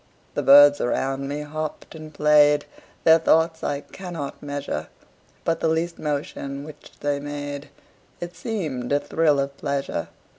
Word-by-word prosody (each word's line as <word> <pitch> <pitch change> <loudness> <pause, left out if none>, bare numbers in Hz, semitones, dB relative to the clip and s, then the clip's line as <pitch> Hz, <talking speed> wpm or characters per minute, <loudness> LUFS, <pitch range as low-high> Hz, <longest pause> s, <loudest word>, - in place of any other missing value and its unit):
The - - -1
birds 145 +1 +8
around 135 +2 -1
me 145 +1 -3
hopped 155 +1 -5
and 155 -1 -10
played, 150 -1 +4 0.4
Their 160 0 +7
thoughts 160 0 +2
I 140 0 -1
cannot 170 -7 -7
measure: 145 - -4 0.6
But 165 - +1
the - - +1
least 165 +1 -1
motion 140 -1 -3
which 150 0 -12
they 145 -1 0
made 145 0 -6 0.5
It 175 0 -6
seemed 160 - -4
a 145 - +3
thrill 150 -2 +2
of 140 0 -2
pleasure. 140 -1 -2
145 Hz, 145 wpm, -24 LUFS, 140-160 Hz, 0.6 s, birds